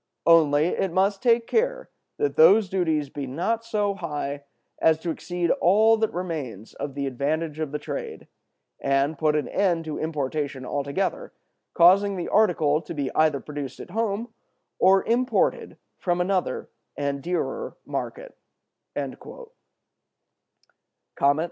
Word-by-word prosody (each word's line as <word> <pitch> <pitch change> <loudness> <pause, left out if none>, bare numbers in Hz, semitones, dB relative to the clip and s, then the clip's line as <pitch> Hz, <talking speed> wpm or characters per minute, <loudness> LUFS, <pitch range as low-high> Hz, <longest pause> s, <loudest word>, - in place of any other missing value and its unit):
Only 155 -3 +5
it 185 +1 -1
must 195 +3 +1
take 235 -2 +3
care - - 0 0.3
that 435 -1 0
those 225 - +6
duties 160 -6 0
be 140 0 -5
not 200 - -1
so 210 -3 0
high 145 -5 -4 0.4
as 160 -1 +4
to 175 - -3
exceed 175 +1 -2
all 215 +6 +4
that 220 0 0
remains 150 - -5
of 140 -2 -5
the 140 -1 -2
advantage 150 +4 -2
of 155 -3 -3
the 150 - -2
trade, 455 - -6 0.5
and 140 +3 +1
put 155 +1 +2
an 150 - 0
end 175 -4 0
to 155 -1 -4
importation 145 -3 -3
altogether, 145 - -2 0.4
causing 195 +3 +5
the 175 - -4
article 160 -8 +3
to 160 - -8
be 140 -3 -2
either 155 -3 +3
produced 145 -1 -7
at - - -9
home, 225 +1 -1 0.5
or 190 +1 +5
imported 250 +2 0 0.2
from 175 -1 0
another 185 +1 -1 0.3
and 140 -1 -1
a - - -13
dearer 475 - -3
market." - - -5
170 Hz, 135 wpm, -25 LUFS, 145-205 Hz, 0.5 s, those